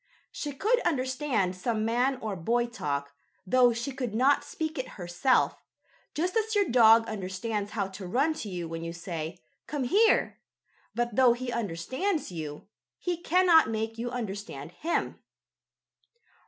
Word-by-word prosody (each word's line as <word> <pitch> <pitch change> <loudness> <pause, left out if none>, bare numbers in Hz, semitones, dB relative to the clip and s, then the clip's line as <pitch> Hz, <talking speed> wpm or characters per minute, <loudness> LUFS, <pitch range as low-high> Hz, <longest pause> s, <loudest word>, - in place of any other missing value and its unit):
She 295 - -4
could 440 - +2
understand 260 - 0
some 215 +4 -1
man 250 +4 +1
or 215 -3 -3
boy 235 +8 +1
talk, 140 -11 -4 0.3
though 245 +4 +5
she 235 +4 -3
could 250 -5 -4
not 265 +5 +4
speak 315 -1 -4
it 260 - -3
herself, 175 +8 +1 0.5
just 355 +6 -1
as 445 -1 +1
your 405 -1 +4
dog 230 -4 +6
understands 205 +1 -3
how 205 -3 0
to 190 -1 -8
run 275 - +2
to 210 - -5
you 175 -3 -4
when 165 0 -5
you 165 0 -4
say: 170 -2 -5 0.3
"Come 290 -3 -2
here!" 420 - +3 0.6
But, 240 -2 -1
though 255 -2 +6
he 245 +1 -4
understands 235 - -2
you, 155 -3 -6 0.3
he 355 -1 -2
cannot 345 -3 +4
make 225 +1 -3
you 240 +1 -2
understand 200 - -5
him. 320 - -2
235 Hz, 150 wpm, -28 LUFS, 190-280 Hz, 0.6 s, dog